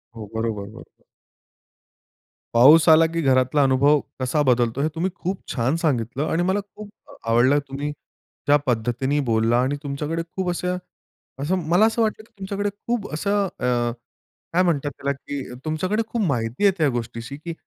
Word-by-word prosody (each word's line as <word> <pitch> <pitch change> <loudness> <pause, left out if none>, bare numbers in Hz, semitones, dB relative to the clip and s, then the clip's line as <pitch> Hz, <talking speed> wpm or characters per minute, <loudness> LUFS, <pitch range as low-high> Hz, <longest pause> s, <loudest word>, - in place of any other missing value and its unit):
हो, 110 -2 -7
बरोबर, 110 -2 -2
बरोबर. - - -15 1.5
पाऊस 150 +8 +7
आला, 160 +1 +7
की 165 +1 -2
घरातला 130 +1 +3
अनुभव 140 +3 +4 0.2
कसा 150 +4 +1
बदलतो 125 0 +2
हे 155 - +2
तुम्ही 180 +4 0
खूप 185 +1 -4
छान 130 +4 0
सांगितलं 135 -3 -1
आणि 175 +2 +1
मला 190 +3 +1 0.2
खूप 210 -1 -9 0.4
आवडलं 130 +5 +4
तुम्ही 140 +2 -4 0.6
ज्या 145 +1 +6
पद्धतीने 125 +4 0
बोलला 115 +1 +2
आणि 135 +3 0
तुमच्याकडे 150 +4 -3
खूप 190 -2 -1
असे, 180 +1 -3 0.7
असं, 160 +7 0
मला 185 +6 +5
असं 225 +1 +1
वाटतं, 215 0 0
की - - -25
तुमच्याकडे 200 +1 -2
खूप 215 +1 -4
असं, 200 +4 0
अ, 120 -1 +1 0.6
काय 180 +2 +4
म्हणतात 145 -5 0
त्याला, 140 +1 -3
की 140 0 -6 0.2
तुमच्याकडे 185 +8 0
खूप 230 -1 -2
माहिती 120 - -2
आहे 200 - +7
त्या 155 -3 +3
गोष्टीची, 120 +2 -5
की 170 +2 -6
145 Hz, 160 wpm, -23 LUFS, 125-175 Hz, 1.5 s, पाऊस